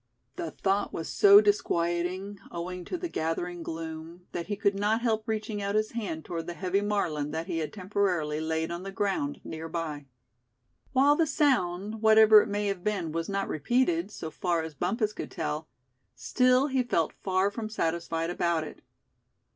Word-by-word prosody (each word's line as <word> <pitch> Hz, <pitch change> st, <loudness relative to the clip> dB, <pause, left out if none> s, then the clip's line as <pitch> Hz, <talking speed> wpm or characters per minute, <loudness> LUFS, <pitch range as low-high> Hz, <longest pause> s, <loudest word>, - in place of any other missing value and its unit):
The 345 Hz, -2 st, -4 dB
thought 195 Hz, +1 st, 0 dB
was 165 Hz, -, -5 dB
so 200 Hz, 0 st, +8 dB
disquieting, 185 Hz, -1 st, 0 dB
owing 180 Hz, +1 st, -5 dB
to 365 Hz, -, -3 dB
the 350 Hz, -, -3 dB
gathering 175 Hz, -, -3 dB
gloom, 165 Hz, +1 st, -7 dB
that 170 Hz, -, -4 dB
he 205 Hz, -, -2 dB
could 200 Hz, 0 st, +2 dB
not 210 Hz, +3 st, +1 dB
help 225 Hz, -2 st, +1 dB
reaching 215 Hz, -1 st, -2 dB
out 200 Hz, +1 st, -1 dB
his 215 Hz, 0 st, +1 dB
hand 200 Hz, -9 st, -4 dB
toward 165 Hz, -1 st, -5 dB
the 175 Hz, -, -5 dB
heavy 190 Hz, +2 st, 0 dB
Marlin 175 Hz, -8 st, -1 dB
that 160 Hz, +2 st, -3 dB
he 165 Hz, -, -2 dB
had 155 Hz, -, -3 dB
temporarily 180 Hz, -6 st, -1 dB
laid 160 Hz, +1 st, -1 dB
on 170 Hz, +1 st, -4 dB
the 195 Hz, +1 st, -6 dB
ground 215 Hz, +9 st, -1 dB
near 160 Hz, 0 st, -6 dB
by. 155 Hz, -4 st, -4 dB, 0.8 s
While 275 Hz, +2 st, +5 dB
the 325 Hz, +1 st, +2 dB
sound, 215 Hz, -, +1 dB
whatever 220 Hz, -1 st, +8 dB
it 220 Hz, -, -4 dB
may 205 Hz, +1 st, -1 dB
have 195 Hz, -3 st, -2 dB
been, 195 Hz, -7 st, -1 dB
was 165 Hz, +2 st, -3 dB
not 195 Hz, 0 st, -1 dB
repeated, 175 Hz, -, +1 dB
so 160 Hz, -6 st, -7 dB
far 170 Hz, 0 st, 0 dB
as 160 Hz, -1 st, -6 dB
Bumpus 210 Hz, -, -1 dB
could -, -, -6 dB
tell, 155 Hz, +1 st, -3 dB, 0.5 s
still 250 Hz, -, +3 dB
he 265 Hz, -3 st, +1 dB
felt 170 Hz, -10 st, 0 dB
far 190 Hz, +1 st, +1 dB
from 215 Hz, 0 st, -5 dB
satisfied 165 Hz, -3 st, -1 dB
about 170 Hz, -2 st, 0 dB
it. 155 Hz, -, -10 dB
185 Hz, 180 wpm, -28 LUFS, 165-215 Hz, 0.8 s, so